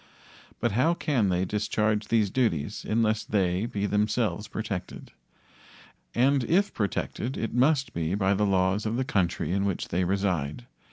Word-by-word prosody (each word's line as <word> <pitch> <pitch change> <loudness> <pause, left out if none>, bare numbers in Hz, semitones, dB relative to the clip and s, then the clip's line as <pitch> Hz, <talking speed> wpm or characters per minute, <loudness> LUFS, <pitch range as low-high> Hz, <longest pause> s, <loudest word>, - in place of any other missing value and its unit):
But 120 - +1
how 135 +11 +2
can 130 - +1
they 90 0 +1
discharge 105 +1 0
these 110 -4 +2
duties 105 - 0
unless 110 -1 +1
they 95 +1 0
be 105 -4 -2
themselves 105 -1 0
protected? 100 -5 -5 1.0
And 135 +2 +3
if 195 - +2
protected 110 +4 -2
it 115 - -3
must 130 0 +2
be 85 +2 -1
by 100 -1 +2
the 105 +1 +1
laws 95 +2 +1
of 110 - -1
the 130 - 0
country 90 -7 0
in 100 +1 +1
which 100 -2 -2
they 90 +2 0
reside. 95 - -1
105 Hz, 155 wpm, -27 LUFS, 95-115 Hz, 1.0 s, And